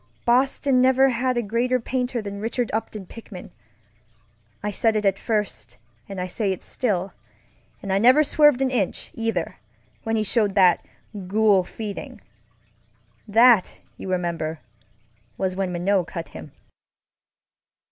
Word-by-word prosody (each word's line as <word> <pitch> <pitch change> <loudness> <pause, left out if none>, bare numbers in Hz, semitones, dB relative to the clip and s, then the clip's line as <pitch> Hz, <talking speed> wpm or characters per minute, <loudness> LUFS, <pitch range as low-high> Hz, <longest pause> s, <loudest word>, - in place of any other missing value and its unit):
Boston 255 +1 +2
never 260 +1 +4
had 255 0 0
a 240 - 0
greater 240 +4 0
painter 250 -1 -2
than 200 0 -6
Richard 235 +1 -2
Upton 215 -2 -4
Pickman. 205 -2 -11 1.1
I 210 - -1
said 220 +2 +1
it 210 -1 0
at 195 0 +2
first 210 - -3 0.3
and 195 -1 -6
I 180 - -2
say 195 +2 -1
it 190 - -5
still, 195 -7 -2 0.7
and 195 -1 -2
I 195 - +2
never 255 +7 +6
swerved 295 -3 +4
an 260 - 0
inch, 210 -8 -2
either, 225 -7 -3 0.4
when 225 0 -2
he 215 - +1
showed 205 -1 +1
that 185 -3 +4 0.4
Ghoul 205 -1 +3
Feeding. 205 +2 -7 1.1
That, 225 -1 +5 0.2
you - - -8
remember, 170 -3 -2 0.8
was 185 -1 -2
when 190 -1 -2
Minot 180 +1 0
cut 170 -2 -6
him. 80 -1 -10
210 Hz, 135 wpm, -23 LUFS, 190-245 Hz, 1.1 s, never